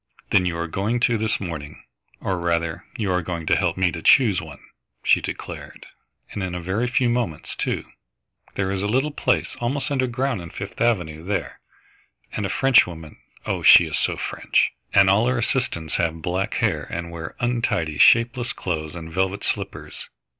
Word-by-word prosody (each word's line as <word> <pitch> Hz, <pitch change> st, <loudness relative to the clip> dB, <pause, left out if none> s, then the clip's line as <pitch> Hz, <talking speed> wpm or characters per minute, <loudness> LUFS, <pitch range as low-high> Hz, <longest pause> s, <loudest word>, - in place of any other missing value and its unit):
"Then 90 Hz, -2 st, +4 dB
you 85 Hz, -1 st, -2 dB
are 85 Hz, -, -2 dB
going 100 Hz, +8 st, -1 dB
to 120 Hz, -1 st, +3 dB
this 110 Hz, -1 st, 0 dB
morning, 80 Hz, -6 st, -7 dB, 0.4 s
or 95 Hz, -2 st, -1 dB
rather 85 Hz, -1 st, -1 dB
you 105 Hz, -5 st, -1 dB
are 90 Hz, 0 st, +1 dB
going 85 Hz, -1 st, -5 dB
to -, -, +3 dB
help -, -, 0 dB
me 95 Hz, -2 st, +2 dB
to 85 Hz, -, -6 dB
choose 110 Hz, -5 st, +5 dB
one," 80 Hz, -3 st, -10 dB, 0.5 s
she -, -, +4 dB
declared, -, -, -7 dB, 0.5 s
"and 100 Hz, -, -5 dB
in 90 Hz, -1 st, -3 dB
a -, -, -3 dB
very 95 Hz, +8 st, -1 dB
few 125 Hz, +1 st, +2 dB
moments, 120 Hz, -10 st, -2 dB
too. -, -, -2 dB, 0.7 s
There 95 Hz, -1 st, -1 dB
is 95 Hz, -1 st, -2 dB
a 100 Hz, -, -1 dB
little 135 Hz, +7 st, +1 dB
place -, -, 0 dB
almost 135 Hz, +5 st, -2 dB
underground 130 Hz, -3 st, 0 dB
in 85 Hz, -, -8 dB
Fifth 100 Hz, +6 st, -8 dB
Avenue 90 Hz, -10 st, 0 dB
there, 100 Hz, +2 st, -3 dB, 0.7 s
and 105 Hz, -2 st, -2 dB
a -, -, -7 dB
Frenchwoman 90 Hz, -, +2 dB, 0.3 s
oh, -, -, -2 dB
she -, -, +8 dB
is -, -, -2 dB
so -, -, 0 dB
French! -, -, 0 dB, 0.2 s
and 100 Hz, -, +6 dB
all 105 Hz, +5 st, +4 dB
her 125 Hz, 0 st, +1 dB
assistants 110 Hz, -, -1 dB
have 80 Hz, -1 st, -1 dB
black 90 Hz, +4 st, -1 dB
hair -, -, 0 dB
and 85 Hz, 0 st, -5 dB
wear 80 Hz, -1 st, -7 dB
untidy, 115 Hz, -11 st, -1 dB
shapeless 120 Hz, +1 st, +4 dB
clothes 80 Hz, -3 st, -4 dB
and 80 Hz, -1 st, -8 dB
velvet 95 Hz, +2 st, -1 dB
slippers. -, -, -4 dB
95 Hz, 180 wpm, -23 LUFS, 85-120 Hz, 0.7 s, she